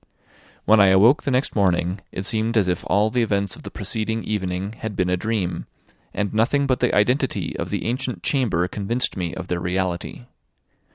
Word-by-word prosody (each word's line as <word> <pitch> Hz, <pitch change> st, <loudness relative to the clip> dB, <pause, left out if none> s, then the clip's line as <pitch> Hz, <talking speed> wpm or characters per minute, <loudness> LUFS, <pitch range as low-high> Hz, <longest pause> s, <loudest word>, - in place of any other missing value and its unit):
When 110 Hz, 0 st, +5 dB
I 100 Hz, -, +7 dB
awoke 105 Hz, +10 st, +5 dB
the -, -, -2 dB
next 130 Hz, +1 st, 0 dB
morning, 95 Hz, -1 st, +1 dB
it 95 Hz, -, -4 dB
seemed 115 Hz, +1 st, 0 dB
as 100 Hz, -4 st, +3 dB
if 90 Hz, -2 st, -1 dB
all 105 Hz, +2 st, +2 dB
the 125 Hz, -, +1 dB
events 100 Hz, -4 st, 0 dB
of -, -, -13 dB
the -, -, -8 dB
preceding 110 Hz, +1 st, -3 dB
evening 95 Hz, -1 st, -3 dB
had 110 Hz, -3 st, -5 dB
been 90 Hz, -1 st, 0 dB
a -, -, +3 dB
dream, 100 Hz, -2 st, -2 dB, 0.4 s
and 105 Hz, 0 st, -2 dB
nothing 130 Hz, +6 st, +2 dB
but 130 Hz, -2 st, +1 dB
the -, -, +1 dB
identity 125 Hz, +6 st, +1 dB
of -, -, -3 dB
the -, -, -3 dB
ancient 120 Hz, -5 st, -3 dB
chamber 115 Hz, -, +1 dB
convinced 110 Hz, +6 st, -1 dB
me 90 Hz, -3 st, -3 dB
of 90 Hz, -1 st, -6 dB
their 90 Hz, -1 st, -1 dB
reality. 90 Hz, -8 st, -3 dB
105 Hz, 190 wpm, -22 LUFS, 90-115 Hz, 0.4 s, I